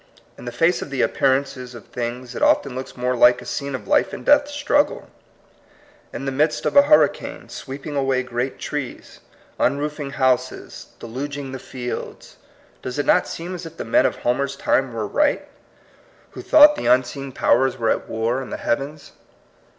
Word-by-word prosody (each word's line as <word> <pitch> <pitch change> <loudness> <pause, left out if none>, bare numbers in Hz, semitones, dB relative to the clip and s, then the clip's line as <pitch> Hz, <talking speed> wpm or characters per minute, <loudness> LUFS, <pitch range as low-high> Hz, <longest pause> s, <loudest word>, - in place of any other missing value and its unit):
In - - -12
the 120 - -4
face 165 +9 +2
of - - -6
the 135 -3 0
appearances 130 -2 0
of 115 - -11
things, 125 +1 -5
it - - -6
often 140 - +3
looks 130 +1 -6
far 125 - -10
more 125 0 +1
like 120 0 +5
a - - -11
scene 140 -1 -4
of - - -8
life 295 - +2
and - - -7
death 290 0 +5
struggle. 290 0 0 1.0
In 135 - -6
the 135 - -1
midst 150 +3 0
of - - 0
a 285 - +10
hurricane, 295 +1 +2
sweeping 140 +2 -7
away 135 -2 +1
great 125 +1 -3
trees, 145 -4 -6 0.4
un 140 - +2
roofing 145 -1 -4
houses, 130 -2 -1
deluging 135 +3 -6
the 130 - -6
fields, 125 -1 -7 0.4
does 125 +1 -5
it 145 - 0
not 180 - +3
seem 175 +2 -6
as 175 -2 -6
if 165 0 -14
the - - -5
men 115 - +4
of - - -4
Homer^s 140 +3 -1
time 135 -2 +1
were 115 -2 -3
right, 290 - +1 0.8
who - - -9
thought 295 -1 +7
the - - -3
unseen 130 +2 +1
powers 130 +1 +2
THE - - -14
DIVINE 115 - +2
UNIVERSE. - - -14
47 - - -20
were 110 - -5
at - - -4
war 130 - -2
in 130 - -8
the - - -4
heavens? 140 +5 -3
135 Hz, 195 wpm, -22 LUFS, 125-150 Hz, 1.0 s, a